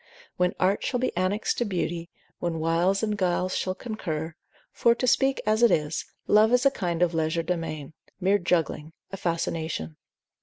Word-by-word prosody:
When 180 0 +1
art 195 +2 +2
shall 250 - -1
be 255 - -1
annexed 185 +4 0
to - - +2
beauty, 175 -3 -2 0.3
when 170 -2 -2
wiles 170 +5 +1
and 210 -1 0
guiles 185 -1 0
shall 185 0 -1
concur; 165 -9 -4 0.4
for 235 0 +3
to 255 - -1
speak 270 +2 +3
as 215 +1 +2
it 235 - +7
is, 155 -3 0 0.2
love 215 +2 +5
is 250 +2 +3
a 275 - +6
kind 175 -7 -1
of 175 -1 +1
legerdemain; 160 -2 -2 0.3
mere 195 +2 +3
juggling, 165 -3 -1 0.2
a 195 - -5
fascination. 160 - -2
180 Hz, 165 wpm, -26 LUFS, 165-210 Hz, 0.4 s, it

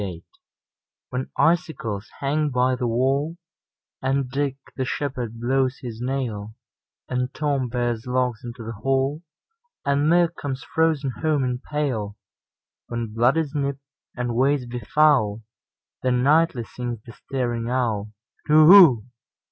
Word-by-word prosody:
Winter 90 -4 -5 0.9
WHEN 130 +1 -3
icicles 135 -11 0
hang 150 +2 +1
by 125 -1 +2
the 125 -1 -2
wallAnd 135 0 -2
Dick 140 0 -1 0.2
the 130 - -1
shepherd 125 -4 -3
blows 130 +2 +1
his 115 -2 -6
nail, 115 -5 -3 0.5
And 125 0 -2
Tom 140 -4 0
bears 120 -1 -2
logs 125 -2 0
into 120 -1 -7
the 115 - -5
hall, 135 +6 0 0.6
And 140 +2 +2
milk 170 0 +3
comes 135 -2 -5
frozen 160 -4 +1
home 155 -3 +1
in 125 -1 -1
pail; 125 -9 -3 0.7
When 115 -2 -4
blood 120 +6 +3
is 155 -3 -1
nipt, 140 -2 -1 0.4
and 120 -1 -2
ways 135 +2 +2
be 120 +1 -5
foul, 115 -4 +2 0.6
Then 125 -1 +1
nightly 150 -3 +3
sings 120 0 -5
the 115 - -10
staring 120 -1 -3
owlTu 115 -4 -1 0.4
whoo! 155 - +8
130 Hz, 130 wpm, -23 LUFS, 120-145 Hz, 0.9 s, whoo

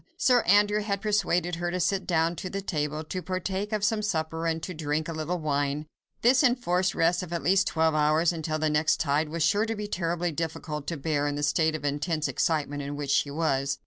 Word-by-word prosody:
Sir 250 -2 +4
Andrew 205 +2 +4
had 200 -1 -2
persuaded 180 -5 0
her 175 0 -2
to 180 +1 -2
sit 195 +2 0
down 165 -1 +1
to 185 - -5
the 195 - -3
table, 155 -5 -2
to 185 +4 -5
partake 190 +3 -3
of 215 -2 -1
some 215 +1 +1
supper 165 -4 -2
and 165 0 -1
to 185 - -4
drink 155 -1 -2
a 165 - -4
little 160 +3 -2
wine. 145 -1 -1 0.4
This 255 +4 +5
enforced 190 -8 +2
rest 170 +3 +2
of 180 -2 -8
at 170 -4 -3
least 190 +5 +3
twelve 160 0 +2
hours, 155 +3 +3
until 160 -1 -2
the 155 0 0
next 150 +1 +2
tide, 150 -1 +1
was 165 0 -1
sure 205 +7 +2
to 225 - -2
be 210 0 -4
terribly 175 -2 -1
difficult 155 -2 -4
to 165 - -3
bear 145 0 0
in 145 - -2
the 145 - -3
state 155 +2 +2
of 150 - -5
intense 150 +2 -1
excitement 145 +1 -1
in 140 +1 -5
which 145 -1 -3
she 140 +1 +2
was. 140 -2 0
165 Hz, 225 wpm, -27 LUFS, 150-185 Hz, 0.4 s, This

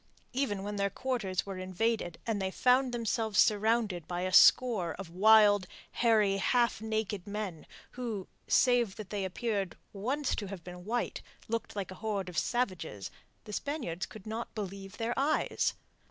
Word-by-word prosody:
Even 245 -7 -1
when 205 0 -4
their 200 0 +1
quarters 205 -5 -2
were 195 -2 -6
invaded 185 -1 -1
and 220 -3 -1
they 190 - 0
found 250 +5 +3
themselves 225 -3 -1
surrounded 210 -5 +3
by 175 0 -3
a 185 0 -2
score 200 -8 +6
of 190 -4 -8
wild, 205 0 +6 0.2
hairy, 215 -4 +3
half 235 +3 +2
naked 215 -3 -2
men, 200 -5 -5 0.2
who 230 -6 -4 0.2
save 240 -5 +3
that 215 -4 -9
they 205 -2 -2
appeared 195 0 -2 0.2
once 255 +8 -1
to 205 - -3
have 190 -3 -7
been 180 0 -9
white 235 +3 -2 0.3
looked 230 -1 -3
like 195 -2 -4
a 185 - -11
horde 205 -4 -2
of 175 - -8
savages, 185 - -2 0.3
the 210 - -9
Spaniards 240 - -3
could 215 -3 -12
not 225 +2 -5
believe 195 -2 -6
their 230 +1 -1
eyes. 295 +3 +1
210 Hz, 160 wpm, -31 LUFS, 190-230 Hz, 0.3 s, score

